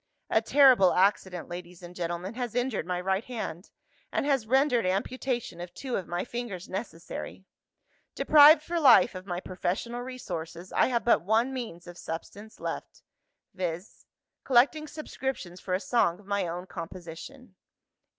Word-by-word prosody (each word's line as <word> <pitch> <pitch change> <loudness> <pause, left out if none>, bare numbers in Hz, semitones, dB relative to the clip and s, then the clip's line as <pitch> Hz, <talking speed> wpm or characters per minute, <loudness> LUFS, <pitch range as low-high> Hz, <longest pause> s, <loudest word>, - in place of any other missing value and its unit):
"A 220 - +4
terrible 255 -6 +6
accident, 190 -2 +1
ladies 175 0 -9
and 175 0 -9
gentlemen, 175 +3 -4
has 245 -2 -4
injured 245 -8 -1
my 180 -1 -1
right 190 +3 0
hand, 210 -8 -6 0.4
and - - 0
has 270 -6 +1
rendered 265 -1 +3
amputation 215 +1 -2
of 175 0 -9
two 260 -3 -4
of 185 - -3
my 175 +1 -2
fingers 235 -8 -5
necessary. 185 -1 -6 0.7
Deprived 300 +1 +7
for 340 +2 -2
life 260 -6 +7
of 185 +1 -9
my 175 -1 -2
professional 190 +7 -3
resources, 180 -9 -7
I - - +4
have 240 -2 -1
but 240 - +4
one 225 +8 +1
means 220 -10 -6
of 175 -1 -11
subsistence 205 +6 -8
left - - -6 0.5
viz: 175 +1 -5 0.4
collecting 275 +5 +3
subscriptions 265 - -5
for 185 - -1
a - - 0
song 200 -6 +1
of 205 - -17
my 200 -2 -1
own 175 +2 -5
composition. 180 +8 -9
200 Hz, 150 wpm, -28 LUFS, 175-250 Hz, 0.7 s, Deprived